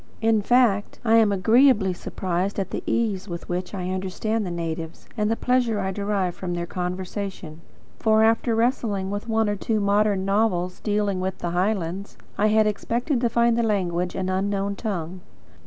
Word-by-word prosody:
In 225 -1 +3
fact, 225 -3 +2
I 225 0 +5
am 220 -2 +5
agreeably 220 0 +4
surprised 185 +2 -3
at 190 -2 -3
the - - -3
ease 210 -4 0
with 170 -1 -6
which 180 +2 -3
I 185 -1 -3
understand 195 +3 -2
the - - -3
natives, 165 -1 -5
and 210 -2 0
the 225 - +2
pleasure 245 -3 +1
I 190 -1 -1
derive 200 -2 -1
from 175 -1 -4
their 170 0 -2
conversation; 180 -2 -5 0.4
for, 220 0 +4
after 225 +1 +2
wrestling 220 -5 0
with 205 +3 -4
one 220 -1 +2
or 205 - 0
two 215 +2 -1
modern 200 -1 +2
novels 195 -3 0
dealing 205 -2 0
with 190 0 -2
the 175 - -3
Highlands, 185 0 -2 0.2
I 210 - +2
had 215 0 +4
expected 235 +5 -1
to 240 - +2
find 235 0 +3
the 235 - +2
language 180 -5 0
an 185 - -2
unknown 200 +1 -1
tongue. 185 -5 -4
200 Hz, 175 wpm, -24 LUFS, 185-220 Hz, 0.4 s, I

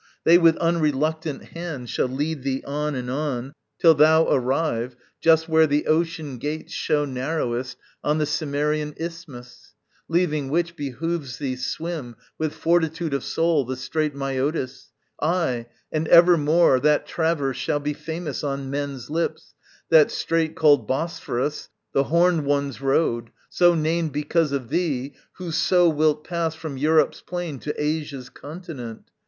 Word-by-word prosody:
They 170 +2 +7
with 165 -2 +5
unreluctant 155 -2 0
hand 165 -7 -6
Shall - - 0
lead 145 +3 -2
thee 135 0 -2
on 150 +1 -2
and 125 -1 -4
on, 135 -1 -3 0.2
till 165 -2 +6
thou 160 +2 +5
arrive 130 -2 0 0.3
Just 160 0 +4
where 160 -1 +4
the 145 +1 +1
ocean 160 -4 -1
gates 150 +4 -4
show 145 -1 0
narrowest 130 -2 -3 0.3
On 150 +1 +1
the 155 - +1
Cimmerian 150 0 -1
isthmus. 150 -8 -9 0.3
Leaving 155 -5 0
which, 170 +3 0
Behoves 145 -1 -4
thee 135 -3 -3
swim 140 -1 -4 0.2
with 155 -1 0
fortitude 165 -2 +1
of 140 - -1
soul 165 -3 +1
The 130 +1 -4
strait 150 +3 -2
Mæotis. 135 -1 -2 0.3
Ay, 150 -8 0 0.2
and 155 0 -1
evermore 170 -4 +6
That 150 +2 +2
traverse 160 -6 -1
shall 145 - -1
be 145 +1 -2
famous 160 -1 -5
on 135 -1 -3
men's 140 -2 -4
lips, 165 +2 -2 0.4
That 160 -2 +6
strait, 165 -1 -1
called 145 -8 +4
Bosphorus, 145 -1 -2 0.2
the 135 - +2
horned 170 +1 +3
one's 140 -2 -1
road, 135 -4 +1 0.2
So 175 -1 +4
named 160 0 0
because 150 +1 +1
of 135 -4 -3
thee, 145 -6 -1 0.2
who 180 -2 -6
so 180 +2 +3
wilt 155 -1 +2
pass 170 -2 -2
From 160 -3 -6
Europe's 155 +3 +2
plain 175 -6 -5
to 150 - -4
Asia's 150 -4 -3
continent. 145 -8 -9
150 Hz, 145 wpm, -23 LUFS, 135-165 Hz, 0.4 s, They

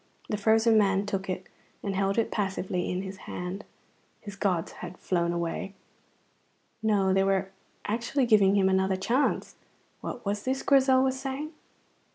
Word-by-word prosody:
The 210 - 0
frozen 220 +1 +4
man 195 -1 +2
took 195 -2 -3
it 185 0 -3 0.4
and 200 -2 -2
held 195 +1 +1
it 230 - +1
passively 190 -3 -2
in 180 +1 -2
his 190 0 -7
hand. 180 +3 -5 0.6
His 205 -1 -9
gods 185 -5 0
had 180 0 -9
flown 170 -2 0
away. 170 +3 -3 1.1
No, 200 -3 +2
they 195 0 +3
were 195 0 +1 0.3
actually 240 +5 0
giving 205 -4 +5
him 195 -1 +4
another 190 0 +2
chance. 235 +9 0 0.4
What 240 - -6
was 205 +1 -1
this 260 +4 -2
Grizel 265 -2 +5
was 265 0 0
saying? 275 +3 -4
200 Hz, 155 wpm, -28 LUFS, 190-225 Hz, 1.1 s, giving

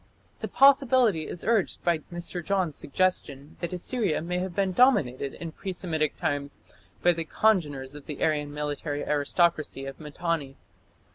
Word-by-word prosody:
The - - -3
possibility 260 - +4
is 175 - -6
urged 220 -3 +1
by 170 -2 +2
Mr. 175 0 -4
Johns's 185 -5 0
suggestion 145 -4 -1
that 170 - -3
Assyria 185 0 0
may 180 +2 -2
have 185 -1 -4
been 195 -1 +1
dominated 150 - +3
in 165 -1 -6
pre 190 +4 -5
Semitic 160 -5 -1
times 145 0 -3 0.4
by 175 - +5
the 165 -1 -3
congeners 150 -9 +1
of 145 -1 -11
the 150 - -4
Aryan 150 -2 +1
military 145 0 -3
aristocracy 150 -1 +1
of 135 0 -8
Mitanni. 150 -2 -3
165 Hz, 150 wpm, -27 LUFS, 145-185 Hz, 0.4 s, by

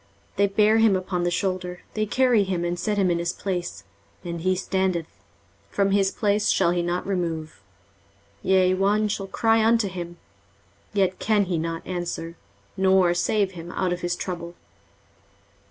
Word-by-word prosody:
23:046:007 - - -35
They 200 +1 +4
bear 210 +2 +3
him 220 -3 +5
upon 185 -1 -2
the - - +2
shoulder, 180 0 -2
they 215 0 0
carry 245 -2 +3
him, 180 -3 -2
and 175 0 -2
set 210 +1 -1
him 190 -3 +3
in 170 - 0
his 170 +1 -1
place, 175 - -4 0.4
and 170 -1 -4
he 185 +2 +2
standeth; 185 -2 -1 0.6
from 195 - +1
his 195 -1 +3
place 205 0 +1
shall 170 - +3
he 175 0 0
not 175 +1 -2
remove: 165 - -3 0.8
yea, 185 -1 +3
one 205 +3 +2
shall 200 -1 -3
cry 225 +2 +2
unto 225 -1 +3
him, 175 -2 -6 0.7
yet 190 -2 +1
can 210 -2 +2
he 175 -3 -1
not 165 0 -4
answer, 175 -2 -4 0.4
nor 190 -2 +4
save 200 +2 +1
him 170 -1 -9
out 185 -2 0
of 180 - -5
his 175 0 -1
trouble. 175 -1 -5
185 Hz, 170 wpm, -24 LUFS, 175-200 Hz, 0.8 s, him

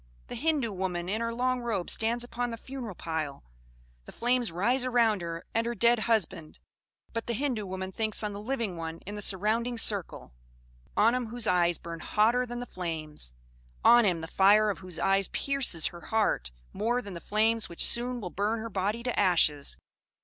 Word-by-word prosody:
The - - -5
Hindoo 290 -8 0
woman 180 -2 -3
in 215 +4 -1
her 230 0 -1
long 250 +1 0
robe 215 -7 -2
stands 235 +2 +1
upon 245 0 -3
the 230 - -5
funeral 245 -5 -7
pile; 160 - -4 0.6
the - - -10
flames 245 -3 +1
rise 240 +10 +1
around 235 -5 +2
her 170 0 -5
and 230 +1 +1
her 240 - -2
dead 235 +2 +4
husband, 215 -8 0 0.6
but 230 0 -4
the 235 - -1
Hindoo 240 -5 -2
woman 190 0 -4
thinks 220 +2 -1
on 210 -1 -2
the 200 - -6
living 225 -6 -2
one 165 0 -5
in 205 - -6
the 210 - -5
surrounding 220 +5 0
circle; 200 - 0 0.6
on 225 +3 +5
him 250 -2 -1
whose 235 +1 -4
eyes 175 -2 +3
burn 170 -1 -8
hotter 235 +8 +2
than 240 0 -5
the 245 - -5
flames 155 - -4 0.5
on 240 0 +8
him, 180 -5 +1
the 160 - -6
fire 205 +4 +5
of - - -7
whose 185 -3 -7
eyes 195 -1 +2
pierces 275 - +1
her 175 - -12
heart 210 - 0 0.2
more 240 +4 0
than 200 - -8
the 170 - -7
flames 220 0 +1
which 170 - +1
soon 245 +1 +3
will 180 -6 -6
burn 210 +3 0
her 230 +1 -5
body 205 +5 -1
to 245 -1 -1
ashes. 165 -7 +3
215 Hz, 195 wpm, -29 LUFS, 180-235 Hz, 0.6 s, on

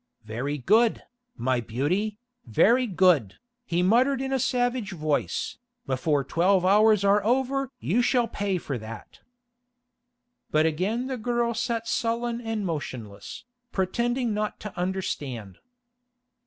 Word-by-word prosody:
"Very 125 +7 -3
good, 220 - +3 0.3
my 125 +1 +1
beauty, 175 - -1 0.3
very 235 - +4
good," 180 - +3 0.3
he 175 +1 +1
muttered 250 +8 +3
in 270 0 -2
a 265 - +1
savage 245 -4 0
voice, 155 -3 -2 0.3
"before 140 +2 0
twelve 180 +6 +2
hours 210 +1 +5
are 200 +1 +4
over 265 +3 +1
you 225 +8 +1
shall 245 -1 +2
pay 200 -4 -1
for 140 -7 -4
that." 110 0 -10 1.3
But 155 +1 +3
again 190 +10 0
the 260 -1 -3
girl 235 +1 0
sat 230 0 -2
sullen 235 +1 -1
and 225 -3 -3
motionless, 125 - -6 0.3
pretending 235 +5 0
not 210 0 -2
to 210 - -7
understand. 145 - -4
200 Hz, 125 wpm, -26 LUFS, 150-235 Hz, 1.3 s, hours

